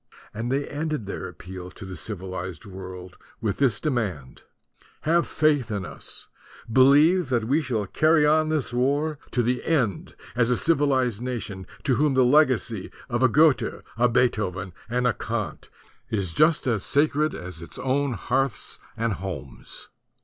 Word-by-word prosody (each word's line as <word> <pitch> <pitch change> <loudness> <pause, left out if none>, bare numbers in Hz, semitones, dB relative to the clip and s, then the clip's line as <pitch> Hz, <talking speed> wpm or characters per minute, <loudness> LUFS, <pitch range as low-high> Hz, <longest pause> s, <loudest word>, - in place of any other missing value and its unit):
And 115 +3 -3
they 140 +1 0
ended 150 -5 -3
their 100 - -5
appeal 90 0 -9
to 95 - -11
the 95 - -7
civi 95 -1 -6
lized 95 0 -6
world 95 -2 -9 0.2
with 110 -5 -1
this 130 -7 +2
demand: 100 - -2 0.6
"Have 170 +2 +2
faith 150 -6 +2
in 100 -4 -3
us! - - -8 0.5
Believe 145 +6 +5
that 120 -3 +1
we 140 +8 +2
shall 120 -8 -1
carry 155 - +3
on 155 +1 +3
this 155 -6 -1
war 145 +4 +1
to 120 - +1
the 125 +1 0
end 125 - 0 0.2
as 115 -1 +3
a 125 - +3
civilized 135 -8 +2
nation, 115 -7 -5 0.2
to 130 -5 +2
whom 145 0 +2
the 130 -1 +5
legacy 125 -7 +2 0.2
of 120 0 -1
a 130 - +5
Goethe, 150 +3 +3
a 120 +2 +3
Beethoven, 105 -7 0 0.2
and 125 +1 0
a 120 - +3
Kant 105 -9 -4 0.4
is 95 -6 -1
just 155 - +3
as 115 -7 0
sacred 150 +1 +2
as 90 -2 -7
its 85 - -9
own 135 0 0
hearths 130 +4 -1 0.2
and 115 -1 0
homes." 85 -8 -7
125 Hz, 160 wpm, -25 LUFS, 100-145 Hz, 0.6 s, Believe